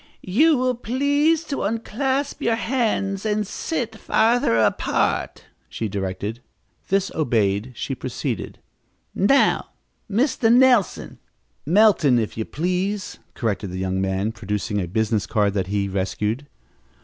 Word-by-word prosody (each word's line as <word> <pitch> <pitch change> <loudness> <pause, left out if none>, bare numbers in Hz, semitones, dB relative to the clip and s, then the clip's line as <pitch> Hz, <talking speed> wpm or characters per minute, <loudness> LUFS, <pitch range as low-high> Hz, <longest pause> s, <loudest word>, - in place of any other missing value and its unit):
"You 310 +6 +5
will 255 0 +1
please 285 +7 +1
to 290 -3 -4
unclasp 260 +6 -2
your 230 -1 +2
hands 225 -5 -1
and 215 -1 0
sit 230 - -3
farther 225 - +2
apart," 110 - 0 0.2
she 110 +10 -3
directed. 100 +3 -4 0.5
This 195 0 +1
obeyed, 115 -5 0
she 135 - -4
proceeded: 125 -3 -4 0.6
"Now, 240 +9 +3 0.4
Mr. 230 +1 +2
Nelson 245 -5 +3 0.2
" - - -45
"Melton, 175 - +5
if 110 -3 -2
you 110 - -3
please," 185 +5 -2 0.2
corrected 105 -4 -2
the 90 - -6
young 95 0 -1
man, 95 +3 -1
producing 105 -2 -3
a 90 - -3
business 110 +2 0
card 105 -3 +1
that 95 -3 -1
he 100 0 0
had 95 - -6
rescued. 105 +7 -2
160 Hz, 130 wpm, -22 LUFS, -, 0.6 s, You